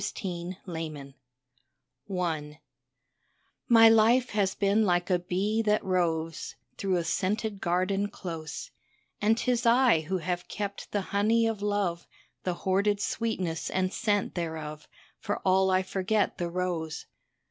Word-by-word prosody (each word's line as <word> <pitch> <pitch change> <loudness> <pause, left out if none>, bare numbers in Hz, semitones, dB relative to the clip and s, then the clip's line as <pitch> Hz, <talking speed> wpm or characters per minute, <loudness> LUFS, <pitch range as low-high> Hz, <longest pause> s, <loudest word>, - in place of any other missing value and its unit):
LOVELACE 180 -1 -4
GROWN 160 -4 -5 1.1
OLD 180 -2 -1
I 150 -2 -4 1.1
My 225 -2 +8
life 225 +3 +5
has 200 -2 +1
been 205 +2 +2
like 175 -2 +1
a 180 - +3
bee 195 +5 0
that 210 -1 +1
roves 165 -3 -1 0.2
Through 195 -2 +1
a 170 - 0
scented 200 +4 -1
garden 185 +3 +1
close, 165 - -6 0.5
And 220 +2 +3
'tis 240 0 +1
I 240 -6 +5
who 160 +5 -2
have 180 0 -3
kept 200 -1 -5
the 205 - 0
honey 220 +3 +3
of 225 -3 -1
love, 205 -5 -1 0.3
The 180 -1 -2
hoarded 200 +3 +1
sweetness 190 -8 -2
and 185 0 0
scent 205 -3 0
thereof, 155 -3 -5 0.3
For 205 -2 -2
all 190 0 +4
I 185 0 +3
forget 195 +3 0
the 175 -1 -1
rose. 170 -3 -3
190 Hz, 135 wpm, -28 LUFS, 175-210 Hz, 1.1 s, My